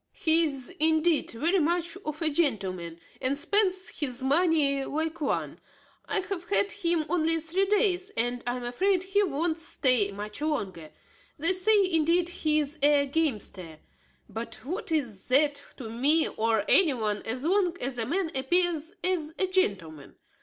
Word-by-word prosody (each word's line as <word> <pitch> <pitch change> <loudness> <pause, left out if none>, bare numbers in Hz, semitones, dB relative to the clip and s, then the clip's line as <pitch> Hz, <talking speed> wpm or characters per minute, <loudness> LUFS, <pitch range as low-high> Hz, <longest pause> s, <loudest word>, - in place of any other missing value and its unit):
He 325 +1 +3
is, 275 -5 -3
indeed, 315 0 +2
very 330 +11 0
much 340 +1 -1
of 305 +2 -4
a 315 - +3
gentleman, 190 - -2 0.2
and 265 +2 0
spends 375 +2 +1
his 260 -4 -1
money 285 -1 +2
like 320 +3 -4
one. 285 - -2 0.5
I 400 - -1
have 380 -2 -5
had 405 0 +2
him 340 -5 -1
only 325 0 +2
three 350 +5 0
days, 395 -2 +1
and 245 +1 -1
I 245 - -1
am 250 - -6
afraid 365 +10 0
he 390 +2 +1
won't 330 -2 -1
stay 250 -9 +1
much 210 +5 -7
longer. 190 - -3 0.5
They 330 +5 +5
say, 400 +2 +3
indeed, 335 +2 +2
he 310 -3 0
is 300 +1 -2
a 285 0 +4
gamester; 215 - -3 0.5
but 230 +2 -8
what 365 - -5
is 245 -11 -2
that 285 +2 +2
to 245 - -7
me 280 +8 +2
or 220 -2 0
any 320 -8 +4
one, 210 -3 -2
as 250 +4 -3
long 355 +1 +1
as 250 -1 -2
a 225 - 0
man 340 +3 -1
appears 335 +4 +1
as 330 -4 -1
a 380 - +1
gentleman? 185 - -2
310 Hz, 160 wpm, -27 LUFS, 250-350 Hz, 0.5 s, They